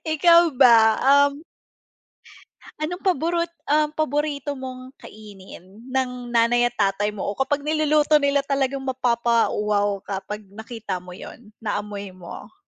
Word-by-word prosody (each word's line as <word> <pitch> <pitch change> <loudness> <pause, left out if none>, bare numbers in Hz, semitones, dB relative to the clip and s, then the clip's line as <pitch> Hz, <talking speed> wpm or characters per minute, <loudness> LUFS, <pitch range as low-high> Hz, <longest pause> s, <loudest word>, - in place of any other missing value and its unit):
Ikaw 335 +2 +5
ba? 225 -4 +6 0.3
Um. 285 +3 -12 1.3
Anong 335 +4 -4
paborot 340 -1 0 0.2
um, 300 +1 +2
paborito 295 -1 -2
mong 260 0 -9
kainin, 200 -1 -13
ng 250 -2 -3
nanay 240 +1 +3
at - - -29
tatay 205 0 +1
mo 205 -2 -6
o 200 - -3
kapag 270 +5 0
niluluto 305 -1 +2
nila 280 0 +2
talagang 275 -1 -1
mapapa-wow 230 -5 0
ka 195 0 -6
'pag 210 0 -6
nakita 215 -2 -7
mo 180 - -12
'yun, 210 +4 -12
naamoy 205 -2 -5
mo? 185 - -11
245 Hz, 130 wpm, -22 LUFS, 210-290 Hz, 1.3 s, ba